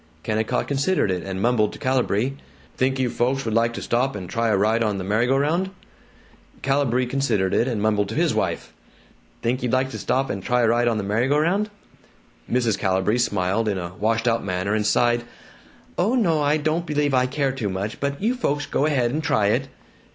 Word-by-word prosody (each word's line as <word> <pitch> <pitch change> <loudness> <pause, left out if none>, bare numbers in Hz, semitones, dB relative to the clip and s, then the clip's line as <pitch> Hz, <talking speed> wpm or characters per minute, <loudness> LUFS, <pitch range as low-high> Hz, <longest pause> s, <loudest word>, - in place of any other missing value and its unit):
Kennicott 110 +1 -1
considered 140 - +1
it, 90 -1 -2
and 95 0 -4
mumbled 115 -3 +2
to - - -9
Calibree, 130 -1 0 0.4
"Think 130 +1 +1
you 130 -1 +1
folks 130 +3 -1
would 110 - -2
like 115 +1 +2
to - - -6
stop 125 +2 0
and 95 -3 -6
try 115 +5 -1
a 105 -3 +2
ride 110 +3 +2
on 105 -3 0
the 95 - -4
merry 105 +5 +1
go 135 +1 +3
round?" 165 +7 +1 0.9
Calibree 135 -2 +1
considered 120 -8 0
it, 120 - +2
and 120 -5 -1
mumbled 105 -2 +1
to 110 - -5
his 165 +1 +2
wife, - - -2 0.7
"Think 125 +2 0
you'd 125 -1 -2
like 130 +1 +1
to - - -6
stop 135 +1 0
and 100 - -4
try 125 +5 +1
a 115 - +3
ride 120 +1 +2
on 115 -2 +1
the 105 - -2
merry 105 +5 0
go 145 +2 +2
round?" 190 +7 +1 0.8
Mrs. 120 -4 +1
Calibree 95 +4 +1
smiled 105 -1 0
in 100 -2 0
a 90 -1 -5
washed 115 +4 0
out 115 -1 +1
manner, 95 +1 -1
and 105 -1 +1
sighed, 120 +2 +2 0.8
"Oh 210 +8 +2
no, 170 -11 +2
I 145 +1 +2
don't 155 +3 -1
believe 145 -2 0
I 125 -1 +3
care 140 0 0
to 125 -6 -3
much, 95 +3 -4
but 140 0 -2
you 225 +5 +1
folks 145 - -1
go 145 - 0
ahead 125 -6 +1
and 155 +4 -1
try 110 -10 +2
it." 130 +5 0
120 Hz, 215 wpm, -23 LUFS, 105-140 Hz, 0.9 s, go